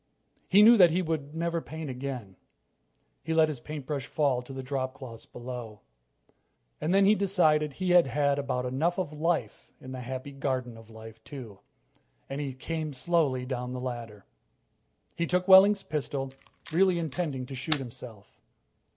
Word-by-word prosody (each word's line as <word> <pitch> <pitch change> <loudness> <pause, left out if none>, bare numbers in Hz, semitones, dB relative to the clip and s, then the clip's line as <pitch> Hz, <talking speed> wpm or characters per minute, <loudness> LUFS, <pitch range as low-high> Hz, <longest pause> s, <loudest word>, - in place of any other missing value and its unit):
He 200 +3 +6
knew 235 +2 +8
that 180 -4 +8
he 180 +3 0
would 155 -2 -3
never 170 0 -1
paint 160 0 -7
again. 125 -6 -6 0.9
He 160 0 -2
let 160 -1 +5
his 145 -5 -5
paintbrush 145 0 -5
fall 140 -5 +1
to 125 - -12
the 135 0 -6
dropcloths 130 -3 -5
below. 120 -4 -7 1.0
And 160 - 0
then 195 +1 +5
he 205 - +6
decided 160 -7 +2
he 185 +4 -1
had 175 -4 +6
had 140 +2 +1
about 130 -3 -2
enough 155 +8 0
of 175 -6 -2
life 160 +2 -2
in 130 - -10
the 130 -1 -6
Happy 130 +3 -6
Garden 130 -3 -3
of 115 0 -14
Life, 110 0 -12
too, 120 -9 -9 0.7
and 135 +2 -4
he 135 -3 -4
came 155 +2 -4
slowly 135 -3 +1
down 125 -1 -3
from 125 - -5
the 130 - -4
ladder. 120 -5 -6 0.9
He 170 - -1
took 180 +2 0
Wehling's 195 +1 +7
pistol, 140 -3 -3 0.4
really 185 +1 +4
intending 155 -5 -3
to 135 - -9
shoot 145 +5 +2
himself. 120 -5 -10
140 Hz, 165 wpm, -28 LUFS, 125-165 Hz, 1.0 s, knew